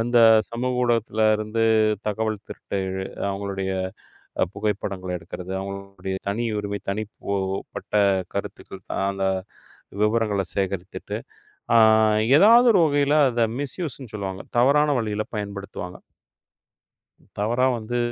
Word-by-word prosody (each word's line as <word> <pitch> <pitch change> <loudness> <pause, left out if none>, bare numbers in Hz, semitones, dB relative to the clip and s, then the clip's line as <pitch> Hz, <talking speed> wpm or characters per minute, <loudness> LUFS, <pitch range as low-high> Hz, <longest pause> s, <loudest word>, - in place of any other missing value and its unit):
அந்தச் 115 -2 +5
சமூக 125 +1 -2
ஊடகத்துல 115 -2 +1
இருந்து 110 +1 -1 0.4
தகவல் 110 0 -1
திருட்டு 100 - -5 0.5
அவங்களுடைய 95 -1 -3 0.8
புகைப்படங்கள 100 -3 -3
எடுக்கிறது, 90 +2 -8
அவங்களுடைய 100 -1 -6
தனியுரிமை, 105 -2 -2
தனிப்போ 100 -1 -4 1.0
கருத்து 100 - -4
கருத்து 95 -1 -7 0.2
அந்த 95 0 -2 0.8
விவரங்களை 105 -2 +1
சேகரித்துட்டு 95 -2 -3 0.6
ஆ - - +8 0.6
எதாவது 230 +6 +7
ஒரு 185 - +5
வகையில 145 -1 +2
அத 120 -1 +2
மிஸ்யூஸ்ன்னு 140 - -5
சொல்லுவாங்க. 95 -2 -4 0.2
தவறான 145 +5 +4
வழியில 110 -2 -2
பயன்படுத்துவாங்க. 100 -3 -6 1.4
தவறா 120 +5 +2
வந்து, 120 +2 -3
105 Hz, 95 wpm, -24 LUFS, 100-120 Hz, 1.4 s, ஆ